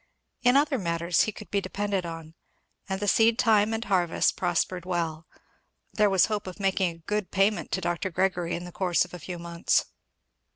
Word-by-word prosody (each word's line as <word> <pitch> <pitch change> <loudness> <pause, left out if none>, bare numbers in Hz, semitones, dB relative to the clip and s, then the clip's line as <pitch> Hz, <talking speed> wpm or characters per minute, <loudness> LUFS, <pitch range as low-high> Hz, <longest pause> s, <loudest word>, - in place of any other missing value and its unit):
In 245 +1 +5
other 285 -2 +2
matters 170 -1 +1
he 215 - -2
could - - -12
be 200 - +1
depended 195 -1 -2
on, 165 -1 -8 0.6
and 190 0 -2
the 205 - -2
seed 225 +3 +4
time 220 -3 +3
and 225 +1 -2
harvest 180 -4 +1
prospered 180 0 -1
well. 165 -3 -3 0.7
There 210 -1 +3
was 190 -2 +4
hope 210 -3 -3
of 185 - -8
making 195 -2 +1
a 165 - -10
good 210 -2 -2
payment 200 +2 +1
to 190 - 0
Dr. 175 +2 -2
Gregory 180 -1 0
in 175 - -6
the 175 - -9
course 180 -1 +1
of - - -17
a 180 - -7
few 175 +3 -6
months. 170 0 0
185 Hz, 195 wpm, -27 LUFS, 170-205 Hz, 0.7 s, In